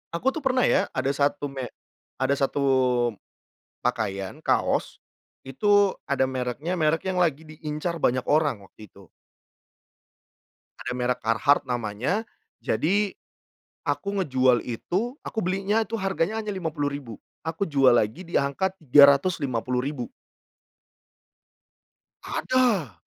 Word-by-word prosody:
Aku 255 +10 +1
tuh 320 - -5
pernah 260 -3 +1
ya - - +3
ada 135 +1 +1
1 145 0 0
me 130 -2 -5 0.5
ada 130 +1 +2
1 140 0 -1 1.2
pakaian 95 -2 -2
kaos, - - 0 0.4
itu 205 +9 +3 0.2
ada 140 -2 0
mereknya 130 +8 -3
merek 155 0 +2
yang 180 - -2
lagi 160 -4 +1
diincar 155 +2 -5
banyak 125 -3 +1
orang 145 -9 +2
waktu 105 +2 -14
itu. 100 -4 -18 1.7
Ada 125 - -4
merek 125 0 -1
Carhartt 115 +6 +3
namanya, 120 - -1 0.4
jadi 200 +4 0 0.7
aku 200 0 -1
ngejual 130 -5 +3
itu 190 - -2
aku 225 - -4
belinya 195 +2 0
itu 225 - -4
harganya 195 0 -1
hanya 210 - -3
Rp50.000. 145 - -3 0.3
Aku 160 +4 -1
jual 135 -8 +4
lagi 120 - 0
diangka 170 +4 0
Rp350.000. 140 -4 +3 2.1
Ada. 215 - 0
145 Hz, 110 wpm, -25 LUFS, 125-185 Hz, 2.1 s, jual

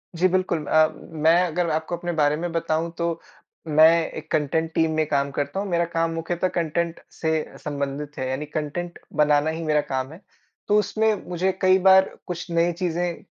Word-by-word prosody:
जी 180 +3 +3
बिल्कुल। 180 -4 0
अ, 155 0 +4
मैं 160 +1 +1
अगर 170 +1 -1
आपको 160 +2 -2
अपने 175 0 -3
बारे 145 +1 +3
में 175 +1 -3
बताऊँ 165 0 -1
तो 170 -1 -1 0.5
मैं 155 +1 +7 0.2
एक 155 0 -9
कंटेंट 160 +2 0
टीम 160 -1 +2
में 155 0 +2
काम 140 -1 0
करता 145 +7 -3
हूँ। 200 - -3
मेरा 170 0 +1
काम 165 0 +1
मुख्यतः 170 +2 -1
कंटेंट 170 0 -1
से 160 -1 -2
संबंधित 145 0 -4
है। 130 0 -2
यानी 135 +3 -3
कंटेंट 155 +4 -4 0.2
बनाना 150 +1 +3
ही 165 +1 -4
मेरा 150 -1 +2
काम 130 -1 -3
है। 180 - -14 0.5
तो 210 - +4
उसमें 215 +1 +1 0.2
मुझे 180 +2 0
कई 185 0 +5
बार 190 0 +6 0.2
कुछ 175 0 -5
नई 170 +1 +2
चीज़ें 175 -1 -2
165 Hz, 185 wpm, -24 LUFS, 150-175 Hz, 0.5 s, मैं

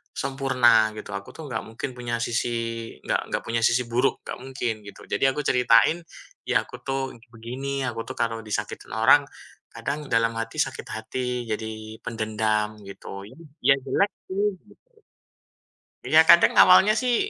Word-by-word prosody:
sempurna," 125 -5 +3
gitu. - - -9
"Aku 100 - -10
tuh 155 -3 -9
nggak 115 -3 -3
mungkin 115 +5 -5
punya 120 -1 -3
sisi, 120 +1 -1 0.6
nggak - - +1
nggak - - 0
punya 115 0 -1
sisi 125 +1 +3
buruk, 125 +3 +1
nggak - - -6
mungkin," 130 -3 -2
gitu. 100 - -12
Jadi - - -1
aku 150 +2 -2
ceritain, 125 +3 +4 0.5
"Ya - - +2
aku - - -12
tuh 135 -2 -3 0.2
begini, 130 +4 -5
aku 115 -1 -5
tuh - - -7
kalau 115 -1 -1
disakitin 105 - -5
orang, - - +5 0.5
kadang 150 0 -4
dalam 115 -2 +2
hati, 115 0 -5
sakit - - -3
hati, 125 +1 -4
jadi 110 0 -5
pendendam," 110 -1 -1
gitu. 100 0 -9 0.4
Ya 135 - +7
jelek 200 +9 +1 0.2
sih, 195 +2 0 0.2
gitu. - - -24 1.1
Iya 160 +1 +5
kadang 170 - +7
awalnya 190 +3 +7
sih, 250 -2 +1
120 Hz, 155 wpm, -25 LUFS, 110-135 Hz, 1.1 s, Ya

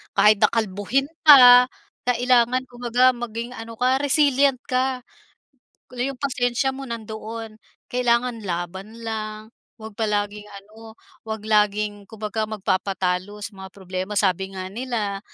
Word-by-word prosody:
kahit 210 -1 +5
na - - +8
kalbuhin 225 +5 -1 0.2
ka, 250 -3 +9 0.4
kailangan 250 0 +2
kumbaga 245 +1 +3
maging 235 0 -6
ano 225 0 -9
ka, 255 +3 +1
resilient 280 -2 +3
ka. 255 0 -1 0.9
Yung 250 +2 -3
pasensya 255 -1 0
mo 270 +1 -7
nandoon, 220 -1 -7 0.3
kailangan 245 -1 +1
laban 190 +4 -5
lang. 215 -1 -4 0.4
Huwag 220 -1 -10
palaging 210 -1 -2
ano, 215 +3 -13 0.2
huwag 220 -1 -6
laging, 210 -1 0
kumbaga 215 0 -4
magpapatalo 190 0 -2
sa 220 - -6
mga 190 - -8
problema. 190 +1 -5
Sabi 190 0 0
nga 185 0 -6
nila, 220 -4 -3
220 Hz, 120 wpm, -23 LUFS, 205-245 Hz, 0.9 s, ka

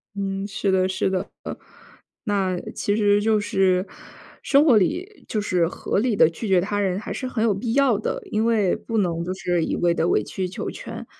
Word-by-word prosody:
嗯， 195 0 -3
是 200 -1 -1
的 185 0 +3
是 190 0 0
的。 190 +1 -2
呃， - - -5 0.7
那 195 -4 0 0.2
其 205 - 0
实 205 -1 +3
就 215 0 +2
是 190 -2 +1 0.5
生 285 +2 +4
活 255 -8 +6
里 360 - -1
就 215 - -1
是 180 -4 +1
合 185 - -2
理 235 -1 +1
地 160 - +5
拒 185 +7 -6
绝 190 -2 +4
他 205 +2 -2
人 190 -1 0
还 - - -6
是 260 - -4
很 240 -3 -1
有 225 -3 +3
必 225 +4 -3
要 275 -6 +3
的， 215 - -3
因 215 +1 +1
为 215 -5 +2
不 225 -1 -4
能 170 -4 0
就 185 +2 -3
是 175 -3 -1
一 - - -1
味 175 -1 +2
地 165 0 0
委 - - +2
曲 185 -1 -4
求 180 - -5
全， - - -8
200 Hz, 230 characters per minute, -23 LUFS, 185-220 Hz, 0.7 s, 活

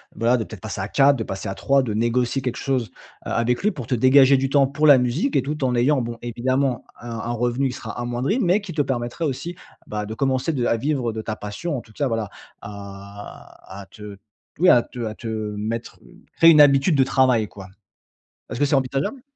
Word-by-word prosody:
voilà 120 +2 +2
de 110 - -2
peut-être 110 -4 -11
passer 110 -3 -6
à 95 - -3
4, 140 +3 +4
de 115 - -3
passer 95 -1 -5
à 95 - -4
3, 135 0 +2
de 110 -4 -3
négocier 120 +3 0
quelque 125 - -2
chose, 130 -4 -1 0.4
heu, - - -4
avec 120 +4 0
lui 210 - +3
pour 125 -5 -8
te 125 - 0
dégager 130 +2 +6
du 135 0 -1
temps 140 -1 +4
pour 150 +2 +1
la 140 -2 +8
musique 125 - -1
et - - +4
tout 150 +1 -4
en 125 -1 0
ayant, 130 +3 +2
bon, 115 0 -5
évidemment 125 +2 -1 0.2
un 120 - -8
un 115 +1 -4
revenu 120 +3 0
qui - - -6
sera 115 +1 -7
amoindri 120 - -1
mais 195 -1 +2
qui 195 -3 -8
te 150 - +1
permettrait 120 +4 -3
aussi, 160 +5 -4 0.3
bah, 105 0 -4
de 110 - -6
commencer 135 +5 0
de 125 -3 -1
à 115 - +1
vivre 130 -2 -1
de 110 - -4
ta 110 - -4
passion 105 +11 -5
en 120 - -5
tout 110 - -20
cas, 145 -2 -1
voilà, 115 -3 -2 0.3
à 100 -1 -11
à - - -11
te 105 -2 -11 0.4
oui 180 +1 +5
à 120 - +6
te 125 - -12
à 110 - -5
te 115 - -8
mettre 110 +1 -4
une - - -19
créer 165 0 +8
une 150 -2 +7
habitude 140 +3 +5
de 135 - +4
travail 130 -5 +2
quoi. 95 -2 -11 0.8
Est-ce 120 - -5
que - - +4
c'est 140 - 0
envisageable? 135 - -2
125 Hz, 235 wpm, -22 LUFS, 110-140 Hz, 0.8 s, la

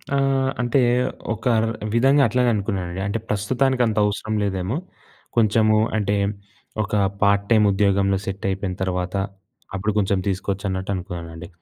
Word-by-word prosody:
ఆహ్, 135 -1 +2
అంటే, 120 +3 +2 0.5
ఒక 110 0 -10 0.2
ర్ 115 - 0 0.2
విధంగా 135 +5 +4
అట్లనే 125 +2 +2
అనుకున్నానండి. 95 -3 -3
అంటే, 100 +3 -1
ప్రస్తుతానికంత 120 +2 +1
అవసరం 110 +1 -2
లేదేమో! 95 +4 -1 0.6
కొంచెము 110 -1 +4 0.2
అంటే, 105 -1 0 0.7
ఒక 100 - -7 0.3
పార్ట్ 100 0 +3
టైమ్ 110 -2 +5
ఉద్యోగంలో 100 0 +2
సెట్టయిపోయిన 95 -1 -3
తర్వాత, 90 0 -2 0.6
అప్పుడు 100 +3 -1
కొంచెం 100 -1 +1
తీసుకోవచ్చు 95 +1 -2
అన్నట్టు 95 +1 -3
అనుకున్నానండి. 85 -2 -7
100 Hz, 125 wpm, -22 LUFS, 95-115 Hz, 0.7 s, టైమ్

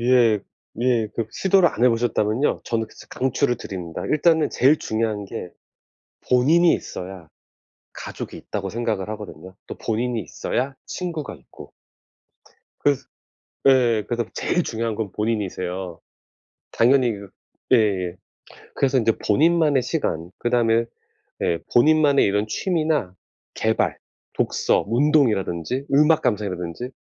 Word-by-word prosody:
예. 120 -3 +4 0.4
예. 120 -4 +2
그 115 - -2
시도를 190 -2 +3
안 120 - -1
해 - - +7
보셨다면요 115 +1 +1
저는 115 -1 -1
그스 - - -16
강추를 130 0 0
드립니다. 90 -4 -6
일단은 160 +1 +3
제일 140 +5 +4
중요한 110 -2 -2
게 90 -2 -7 0.8
본인이 160 +8 +5
있어야 90 -3 -6 0.7
가족이 - - -7
있다고 100 -2 -5
생각을 110 -4 -2
하거든요, 95 -4 -8
또 - - -7
본인이 115 +1 -1
있어야 135 +8 -3
친구가 165 - -5
있고. 65 - -15 1.1
그래서 145 -2 +1 0.7
예 120 -5 +4
그래서 120 -1 -1
제일 175 - 0
중요한 115 -3 -2
건 105 -3 -4
본인이세요. 95 -5 -3 0.7
당연히 125 0 +3
그 100 -2 -10 0.4
예예 95 -7 +2 0.6
그래서 135 -1 +2
인제 115 -2 +3
본인만의 150 +3 +3
시간 90 - -2
그다음에 115 -1 +2 0.6
예 85 - +1
본인만의 145 +2 +5
이런 105 +2 0
취미나 155 - -1 0.4
계발, - - 0 0.4
독서, - - +1
운동이라든지 120 - +1
음악 150 +2 +5
감상이라든지 100 +1 -2
115 Hz, 290 characters per minute, -23 LUFS, 105-140 Hz, 1.1 s, 해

